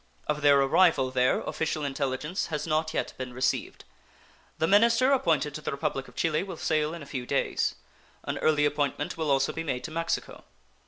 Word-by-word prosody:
Of 150 Hz, 0 st, -2 dB
their 145 Hz, -1 st, +6 dB
arrival 135 Hz, -1 st, +3 dB
there 130 Hz, 0 st, +2 dB
official 155 Hz, -2 st, -2 dB
intelligence 140 Hz, +5 st, -2 dB
has 150 Hz, -2 st, -3 dB
not 155 Hz, 0 st, 0 dB
yet -, -, -2 dB
been 125 Hz, -1 st, -5 dB
received. 130 Hz, 0 st, -1 dB, 0.7 s
The 160 Hz, -, +1 dB
minister 230 Hz, +7 st, +4 dB
appointed 155 Hz, -, +2 dB
to 155 Hz, -, -6 dB
the -, -, -4 dB
Republic 135 Hz, -1 st, -3 dB
of -, -, -16 dB
Chile 155 Hz, -2 st, +1 dB
will 190 Hz, -3 st, -6 dB
sail 155 Hz, +1 st, 0 dB
in 165 Hz, -, -8 dB
a -, -, -10 dB
few 130 Hz, -3 st, -5 dB
days. -, -, 0 dB, 0.5 s
An -, -, -3 dB
early 150 Hz, -1 st, +3 dB
appointment 145 Hz, -1 st, -1 dB
will 160 Hz, -2 st, -2 dB
also 135 Hz, -1 st, +2 dB
be 165 Hz, -, -4 dB
made 130 Hz, -6 st, -3 dB
to 155 Hz, -, -6 dB
Mexico. 165 Hz, +1 st, -3 dB
150 Hz, 190 wpm, -27 LUFS, 135-165 Hz, 0.7 s, their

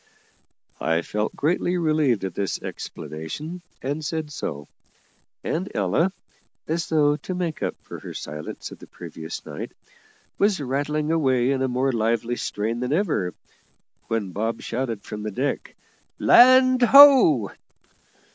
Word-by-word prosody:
I 80 Hz, +1 st, 0 dB
felt 105 Hz, +4 st, -3 dB
greatly 175 Hz, +4 st, 0 dB
relieved 155 Hz, -, +1 dB
at 95 Hz, -, -5 dB
this 100 Hz, 0 st, -2 dB
explanation, 145 Hz, -, -7 dB, 0.2 s
and 145 Hz, +4 st, -3 dB
said 155 Hz, 0 st, -3 dB
so; 75 Hz, -, -5 dB, 0.8 s
and 180 Hz, +4 st, -2 dB
Ella, 105 Hz, -, +1 dB, 0.6 s
as 165 Hz, +1 st, -2 dB
though 150 Hz, -2 st, +3 dB
to 180 Hz, +5 st, -6 dB
make 175 Hz, -4 st, -3 dB
up -, -, -2 dB
for -, -, -9 dB
her -, -, -9 dB
silence 75 Hz, +1 st, -7 dB
of -, -, -11 dB
the -, -, -13 dB
previous 80 Hz, 0 st, -8 dB
night, -, -, -7 dB, 0.7 s
was 200 Hz, -2 st, +2 dB
rattling 145 Hz, +3 st, -1 dB
away 130 Hz, -5 st, +2 dB
in 135 Hz, -1 st, 0 dB
a 130 Hz, -, +1 dB
more 130 Hz, +2 st, 0 dB
lively 115 Hz, +1 st, 0 dB
strain 115 Hz, +1 st, -3 dB
than 125 Hz, +3 st, -1 dB
ever, 155 Hz, -, 0 dB, 0.7 s
when 110 Hz, -4 st, -2 dB
Bob 110 Hz, +4 st, -3 dB
shouted 115 Hz, -4 st, -3 dB
from 105 Hz, -, -7 dB
the 105 Hz, -, -3 dB
deck, 130 Hz, +8 st, -3 dB, 0.4 s
"Land 255 Hz, +1 st, +6 dB
ho!" 245 Hz, -, +7 dB
135 Hz, 135 wpm, -24 LUFS, 110-160 Hz, 0.8 s, ho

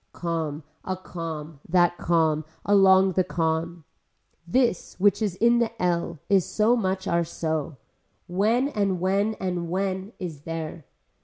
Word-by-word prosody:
Calm, 160 Hz, -3 st, -3 dB, 0.2 s
a 185 Hz, 0 st, -3 dB
calm, 165 Hz, -4 st, -7 dB
that 175 Hz, 0 st, +4 dB
calm, 160 Hz, -2 st, +2 dB, 0.2 s
along 190 Hz, -1 st, +5 dB
the 185 Hz, +1 st, +2 dB
calm. 165 Hz, 0 st, -2 dB, 0.6 s
This 235 Hz, -1 st, 0 dB
which 205 Hz, +1 st, +3 dB
is 205 Hz, -5 st, 0 dB
in 235 Hz, +4 st, +4 dB
the 230 Hz, -1 st, -1 dB
ell 170 Hz, -1 st, 0 dB
is 195 Hz, -2 st, +4 dB
so 220 Hz, +7 st, +2 dB
much 190 Hz, -4 st, -1 dB
are 170 Hz, 0 st, +2 dB
so. 160 Hz, -3 st, -3 dB, 0.5 s
When 215 Hz, +9 st, +1 dB
and 200 Hz, -7 st, 0 dB
when 200 Hz, +4 st, +1 dB
and 180 Hz, -3 st, -3 dB
when 190 Hz, +3 st, -2 dB
is 170 Hz, -8 st, -6 dB
there. 165 Hz, -1 st, -6 dB
180 Hz, 140 wpm, -25 LUFS, 165-200 Hz, 0.6 s, along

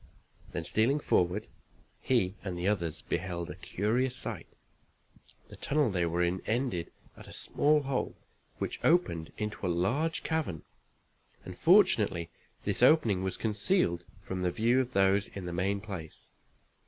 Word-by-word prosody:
Then, 85 Hz, -, -3 dB
stealing 115 Hz, -, +2 dB
forward 95 Hz, -4 st, +1 dB, 0.5 s
he 115 Hz, -8 st, +1 dB
and 95 Hz, -3 st, -4 dB
the 90 Hz, +2 st, -1 dB
others 85 Hz, -6 st, -1 dB
beheld 85 Hz, -1 st, -3 dB
a -, -, -8 dB
curious 120 Hz, +6 st, -1 dB
sight. -, -, -5 dB, 1.0 s
The -, -, -10 dB
tunnel 145 Hz, -5 st, +1 dB
they 90 Hz, -2 st, +1 dB
were 85 Hz, +1 st, 0 dB
in 90 Hz, +1 st, 0 dB
ended 110 Hz, -8 st, -1 dB, 0.2 s
at -, -, -13 dB
a -, -, -11 dB
small 150 Hz, 0 st, +2 dB
hole 135 Hz, -1 st, -2 dB, 0.4 s
which -, -, -3 dB
opened 85 Hz, -, +2 dB
into 105 Hz, -1 st, -4 dB
a 90 Hz, -, +1 dB
large 125 Hz, -, 0 dB
cavern, 155 Hz, -, -2 dB, 0.8 s
and, 90 Hz, -, -7 dB
fortunately, 110 Hz, -, +4 dB, 0.3 s
this -, -, +1 dB
opening 115 Hz, -, +5 dB
was 95 Hz, 0 st, -2 dB
concealed 105 Hz, -, +1 dB, 0.2 s
from 95 Hz, 0 st, -4 dB
the 90 Hz, -, +1 dB
view 120 Hz, +7 st, +2 dB
of 130 Hz, -1 st, -1 dB
those 95 Hz, +1 st, +3 dB
in 95 Hz, -2 st, -5 dB
the 90 Hz, -, -4 dB
main 95 Hz, +3 st, 0 dB
place. 95 Hz, -7 st, -8 dB
100 Hz, 150 wpm, -30 LUFS, 90-130 Hz, 1.0 s, opening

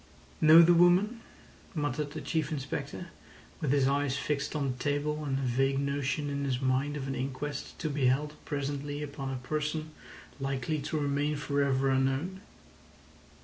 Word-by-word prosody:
"Know 160 Hz, +2 st, +9 dB
the 175 Hz, +1 st, +6 dB
woman?" 180 Hz, +7 st, +4 dB, 0.5 s
muttered 145 Hz, -1 st, -2 dB
the -, -, -5 dB
Chief 160 Hz, -2 st, -1 dB
Inspector, 145 Hz, +3 st, -4 dB, 0.5 s
with 150 Hz, -5 st, 0 dB
his 140 Hz, -2 st, +3 dB
eyes 140 Hz, -1 st, +1 dB
fixed 145 Hz, +1 st, -2 dB
on 140 Hz, -3 st, 0 dB
the 125 Hz, -, -7 dB
table, 145 Hz, +2 st, -1 dB
and 135 Hz, -2 st, -1 dB
a -, -, -2 dB
vague 135 Hz, +2 st, +1 dB
notion 140 Hz, +1 st, -1 dB
in 140 Hz, 0 st, -2 dB
his 130 Hz, -3 st, 0 dB
mind 135 Hz, +3 st, 0 dB
of 135 Hz, -2 st, -4 dB
an 135 Hz, -, -2 dB
inquest 135 Hz, +2 st, -4 dB
to 160 Hz, -, -3 dB
be 140 Hz, -3 st, +1 dB
held 145 Hz, +4 st, +1 dB
presently 145 Hz, 0 st, -3 dB
upon 140 Hz, -2 st, -5 dB
a 135 Hz, -, -3 dB
person 155 Hz, +1 st, -2 dB, 0.5 s
likely 135 Hz, +2 st, -1 dB
to 155 Hz, +2 st, -3 dB
remain 145 Hz, +1 st, 0 dB
for 145 Hz, 0 st, -1 dB
ever 135 Hz, -1 st, +2 dB
unknown. 135 Hz, +8 st, 0 dB
145 Hz, 165 wpm, -30 LUFS, 135-150 Hz, 0.5 s, Know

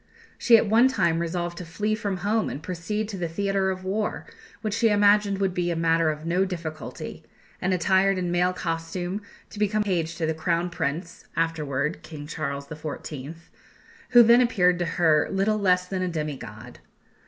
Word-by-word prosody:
She 235 Hz, -2 st, +7 dB
at -, -, +2 dB
one 225 Hz, +4 st, +5 dB
time 170 Hz, -10 st, +1 dB
resolved 175 Hz, 0 st, -3 dB
to -, -, -5 dB
flee 210 Hz, +6 st, -2 dB
from 205 Hz, -3 st, -2 dB
home 215 Hz, +1 st, +1 dB
and 145 Hz, -, -6 dB
proceed 195 Hz, +5 st, -3 dB
to 200 Hz, -, -5 dB
the 175 Hz, -2 st, -2 dB
theatre 195 Hz, +3 st, 0 dB
of 185 Hz, 0 st, -4 dB
war, 210 Hz, +3 st, -2 dB, 0.4 s
which 215 Hz, -2 st, -1 dB
she 225 Hz, +1 st, +3 dB
imagined 205 Hz, -1 st, +4 dB
would 195 Hz, -2 st, 0 dB
be 175 Hz, -1 st, -1 dB
a 170 Hz, -, 0 dB
matter 165 Hz, 0 st, +2 dB
of 155 Hz, +1 st, -4 dB
no 175 Hz, +3 st, +2 dB
difficulty, 165 Hz, -5 st, -6 dB, 0.4 s
and, 190 Hz, -, 0 dB
attired 190 Hz, +2 st, +3 dB
in 180 Hz, -1 st, -1 dB
male 180 Hz, +1 st, +2 dB
costume, 175 Hz, +2 st, -3 dB, 0.3 s
to 205 Hz, -, -9 dB
become 210 Hz, 0 st, +1 dB
page 170 Hz, -5 st, -1 dB
to 165 Hz, -, -2 dB
the 160 Hz, -, 0 dB
Crown 170 Hz, +2 st, -1 dB
Prince 170 Hz, +2 st, -4 dB
(afterwards 150 Hz, -3 st, -1 dB
King 150 Hz, -3 st, -9 dB
Charles 140 Hz, -3 st, -4 dB
XIV.), 150 Hz, -1 st, -7 dB, 0.7 s
who 240 Hz, -1 st, +8 dB
then 235 Hz, +2 st, +6 dB
appeared 180 Hz, -7 st, +3 dB
to 175 Hz, -, 0 dB
her 160 Hz, -4 st, +4 dB
little 200 Hz, +2 st, +1 dB
less 180 Hz, -2 st, +3 dB
than 185 Hz, 0 st, -3 dB
a 185 Hz, -, 0 dB
demi 155 Hz, -4 st, -3 dB
god. 110 Hz, 0 st, -11 dB
180 Hz, 185 wpm, -25 LUFS, 165-200 Hz, 0.7 s, who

